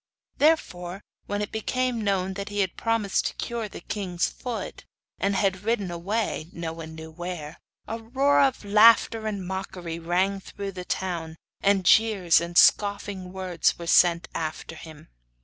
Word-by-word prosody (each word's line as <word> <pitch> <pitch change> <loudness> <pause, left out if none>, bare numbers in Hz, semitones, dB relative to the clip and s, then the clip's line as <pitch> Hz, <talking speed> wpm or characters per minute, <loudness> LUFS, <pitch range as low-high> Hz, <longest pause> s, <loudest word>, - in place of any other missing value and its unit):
Therefore, 195 - +1 0.2
when 205 0 -1
it 205 - -6
became 245 +1 -1
known 190 -2 0
that 200 +1 -5
he 205 0 -1
had 190 -3 -1
promised 225 -4 0
to - - -6
cure 230 -3 -4
the - - -9
king's 185 -4 -2
foot, 235 -6 -6 0.4
and 200 +1 +1
had 190 -1 +1
ridden 205 -4 -1
away 175 -1 -2
no 165 -1 -5
one 160 -1 -9
knew 160 0 -9
where 170 -2 -6 0.3
a 225 - -4
roar 265 +5 +2
of 265 -5 +1
laughter 220 +1 +5
and 200 -3 -3
mockery 180 -3 -5
rang 185 +4 0
through 200 +1 -7
the 180 -1 -7
town, 170 -4 -3 0.3
and 195 -2 +2
jeers 195 -6 +5
and 170 0 -4
scoffing 200 -2 +3
words 185 -2 0
were 170 - -7
sent 170 0 +4
after 160 0 -4
him. 155 - -12
190 Hz, 160 wpm, -26 LUFS, 175-215 Hz, 0.4 s, laughter